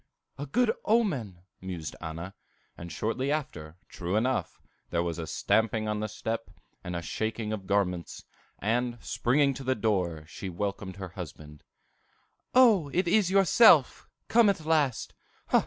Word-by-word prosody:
"A 145 - -4
good 240 - +2
omen!" 135 - 0 0.2
mused 90 -4 -6
Anna; 85 +3 -6 0.4
and 85 0 -9
shortly 120 - -2
after, 85 - -4
true 90 +2 -4
enough, 125 +4 0 0.3
there 85 0 0
was 85 -1 -3
a 80 - -4
stamping 110 +3 +1
on 105 0 -1
the 110 - -2
step, 115 +2 -4 0.3
and 90 0 -5
a 85 - -3
shaking 110 +3 -3
of 100 -3 -6
garments; 90 -4 -1 0.3
and, 120 +3 -1
springing 140 +5 +1
to 135 - -8
the 130 0 +1
door, 90 -8 -1
she 95 +4 -7
welcomed 95 +1 -4
her 95 -2 -7
husband. 75 -4 -9 0.9
"O, 220 - +6
it 180 +3 +1
is 195 0 +3
yourself! 195 +4 +5 0.2
come 230 -2 +5
at 170 -6 -1
last. 150 -6 +1
110 Hz, 145 wpm, -28 LUFS, 90-145 Hz, 0.9 s, O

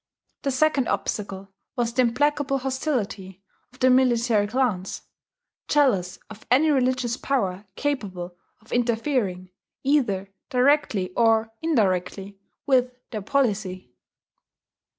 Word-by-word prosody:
The 280 - -1
second 275 -1 +2
obstacle 195 -2 -3 0.3
was 235 -1 -1
the 255 - +3
implacable 275 +3 +1
hostility 245 - -3 0.3
of 250 - -19
the 255 0 +4
military 240 -4 +3
clans, 210 -6 -1 0.6
jealous 210 -12 +2
of 215 0 -12
any 290 +6 +4
religious 255 -3 +1
power 200 -9 -2
capable 190 -11 -3 0.3
of 220 - -21
interfering, 230 -6 -1 0.3
either 205 -9 +1 0.2
directly 250 -8 +2
or 225 0 +3
indirectly, 200 - 0 0.3
with 255 -2 +3 0.2
their 215 -3 -4
policy. 195 - -1
235 Hz, 105 wpm, -24 LUFS, 195-265 Hz, 0.6 s, the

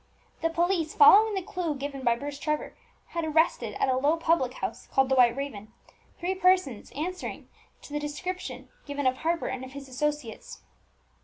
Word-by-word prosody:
The 330 - +2
police, 335 -1 0
following 415 +8 +7
the 380 - -2
clue 340 -4 -3
given 275 0 -5
by 235 -1 +3
Bruce 285 +3 -6
Trevor, 300 -1 -2 0.3
had 335 -1 -3
arrested 315 -8 +1
at - - +1
a 260 - +2
low 290 +5 +2
public 325 -6 +1
house, - - -5
called 270 -1 +2
the 265 - +3
White 240 -2 +5
Raven, 220 -7 -5 0.5
three 360 +2 -1
persons 365 - +2
answering 360 +6 -5 0.3
to 290 - -11
the 295 - 0
description 295 -4 -5 0.2
given 285 -1 -3
of 255 0 +2
Harper 330 +3 -1
and 260 0 -3
his 270 +1 -9
associates. 270 -3 -4
290 Hz, 170 wpm, -28 LUFS, 260-335 Hz, 0.5 s, following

